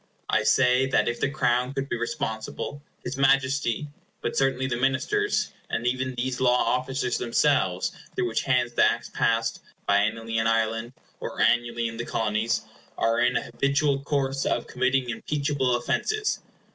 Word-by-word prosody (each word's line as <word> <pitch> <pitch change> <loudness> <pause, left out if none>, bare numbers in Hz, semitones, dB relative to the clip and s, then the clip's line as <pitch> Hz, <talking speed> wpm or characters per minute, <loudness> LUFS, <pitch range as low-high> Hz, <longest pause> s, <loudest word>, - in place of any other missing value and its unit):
I - - +3
say 130 0 +4
that 135 - +2
if 120 0 -1
the 135 - +1
Crown 125 -2 0
could 135 0 -2
be - - -2
responsible, 115 +4 -4 0.2
his 130 +2 -4
Majesty—but 140 0 0
certainly 135 -1 +1
the 130 -2 -1
Ministers,—and 135 - -1
even 130 +1 -1
these 125 +1 -2
law 125 -1 +4
officers 125 0 0
themselves 115 -7 +1 0.2
through - - 0
whose 115 - 0
hands 125 -2 +1
the - - +4
Acts 115 0 +1
passed, 115 0 0 0.3
biennially 110 +3 +1
in 110 - +1
Ireland, 115 +1 0 0.3
or - - -6
annually 120 -1 +2
in 115 0 -7
the 120 - -3
Colonies—are 115 +1 -1
in 120 0 +3
an - - -2
habitual 140 +3 +1
course 135 -1 -1
of 120 - 0
committing 130 +1 0
impeachable 135 +1 0
offences. 425 - 0
125 Hz, 145 wpm, -26 LUFS, 115-135 Hz, 0.3 s, say